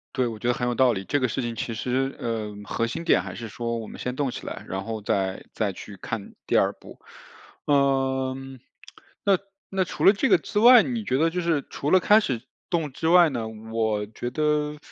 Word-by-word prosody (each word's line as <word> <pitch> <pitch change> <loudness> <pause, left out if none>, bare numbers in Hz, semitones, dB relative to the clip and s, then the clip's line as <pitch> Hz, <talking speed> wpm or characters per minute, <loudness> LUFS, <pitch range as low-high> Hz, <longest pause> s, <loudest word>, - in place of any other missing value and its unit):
对， 130 -2 +1
我 115 -2 -5
觉 120 - -1
得 - - +4
很 120 - -2
有 120 - 0
道 130 -1 +4
理。 95 -4 -4
这 145 - +1
个 130 - +3
事 125 - -2
情 120 -1 -3
其 115 - -3
实， 130 +4 -1
呃， 110 -3 -3
核 115 - -1
心 125 +8 -5
点 - - +4
还 - - -7
是 115 - -7
说 115 +2 -3
我 110 -2 -6
们 - - -10
先 125 0 -4
动 140 -1 0
起 - - -7
来， - - -7
然 95 +1 -4
后 110 0 -5
再 95 -2 -1
再 105 -3 -1
去 100 +2 -10
看 100 +1 -6
第 - - +2
2 - - +3
步。 - - -15 0.7
呃， 135 -2 +2 0.9
那 195 -2 +3 0.3
那 190 -1 +1
除 - - -5
了 - - +9
这 215 +6 0
个 190 -6 +6
之 205 +5 -2
外， 240 +1 +9
你 235 -4 -3
觉 130 - +1
得 165 +3 +3
就 180 +2 -3
是 165 -5 0
除 145 - -3
了 185 - +7
开 210 +4 +6
始 130 - -2 0.3
动 165 -5 -1
之 160 +5 -3
外 175 0 +7
呢， 120 -5 -3
我 110 -1 -2
觉 115 +3 -5
得 150 +2 0
130 Hz, 240 characters per minute, -25 LUFS, 115-160 Hz, 0.9 s, 了